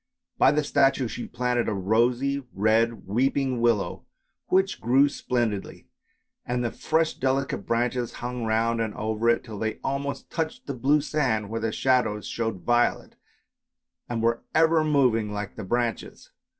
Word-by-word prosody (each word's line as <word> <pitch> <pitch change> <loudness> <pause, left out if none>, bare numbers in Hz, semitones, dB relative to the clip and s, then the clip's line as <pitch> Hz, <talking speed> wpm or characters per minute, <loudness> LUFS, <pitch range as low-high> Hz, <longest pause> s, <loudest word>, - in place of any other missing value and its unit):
By 135 - +6
the 150 +1 +1
statue 135 -3 +2
she 120 - -6
planted 125 -2 -1
a 105 - -1
rosy 120 +8 +1
red 110 +3 +1
weeping 130 +3 0
willow 110 -7 0 0.4
which 190 +1 +1
grew 130 +5 +4
splendidly, 120 -7 -3 0.5
and 125 0 -2
the 115 - -1
fresh 160 0 0
delicate 130 -5 -1
branches 120 +1 0
hung 125 0 -4
round 115 +1 +1
and 110 -2 -3
over 110 +2 0
it, 115 - +2
till 110 -4 -8
they 110 -1 -1
almost 140 +1 -3
touched 160 -1 -3
the 140 - -4
blue 140 +4 +2
sand 125 -9 -1
where 115 0 -3
the 115 0 -1
shadows 120 -5 +1
showed 110 -5 -3
violet, 120 0 +1 0.9
and 115 -2 -2
were 115 0 +1
ever 160 0 +4
moving 125 -8 +2
like 105 -1 -5
the 110 - -6
branches. 120 +3 -3
120 Hz, 150 wpm, -26 LUFS, 110-135 Hz, 0.9 s, By